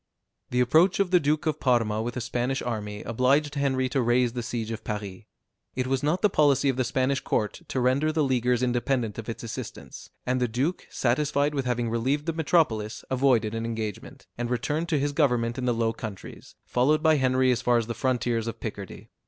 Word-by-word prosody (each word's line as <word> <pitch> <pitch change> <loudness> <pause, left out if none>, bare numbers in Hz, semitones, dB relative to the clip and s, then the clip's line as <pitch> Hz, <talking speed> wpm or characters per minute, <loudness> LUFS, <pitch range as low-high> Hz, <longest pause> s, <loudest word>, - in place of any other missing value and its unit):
The 125 0 +1
approach 160 +11 +4
of 195 -2 +1
the 180 - +6
Duke 150 0 0
of 155 -1 -1
Parma 115 -4 +1
with 120 +2 -4
a - - -2
Spanish 125 +2 -2
army 105 -3 -4
obliged 135 +6 +1
Henry 135 -3 0
to 130 +1 0
raise 120 0 +2
the 125 - -3
siege 115 -1 -4
of 115 - -6
Paris. 105 -1 -5 0.5
It 130 - -1
was 130 0 0
not 155 +7 0
the - - +7
policy 140 -3 +3
of 130 - +1
the 130 - +1
Spanish 130 +2 0
court 105 -1 -2
to 130 - -2
render 130 +5 +2
the 155 -1 +1
Leaguers 125 -2 +1
independent 120 -2 0
of 115 - -7
its 115 - -6
assistance, 115 - -8 0.2
and 125 0 0
the 125 - +2
duke, 135 +10 -2
satisfied 145 +3 +1
with 135 -3 -2
having 120 -1 0
relieved 130 +6 0
the 165 - -1
metropolis, 145 -10 0
avoided 125 -5 +2
an 115 0 -3
engagement, 110 -3 -5
and 120 0 -2
returned 150 +7 -1
to 155 - +2
his 145 +1 0
government 125 -5 +1
in 125 - -2
the 125 - +2
Low 115 -1 0
Countries, 110 -4 -9
followed 150 +5 +2
by 160 -1 +5
Henry 130 -1 +3
as 120 -1 0
far 120 -1 +3
as 115 - 0
the 115 - -4
frontiers 120 -1 -1
of 115 - -5
Picardy. 100 -4 -7
125 Hz, 210 wpm, -26 LUFS, 115-140 Hz, 0.5 s, the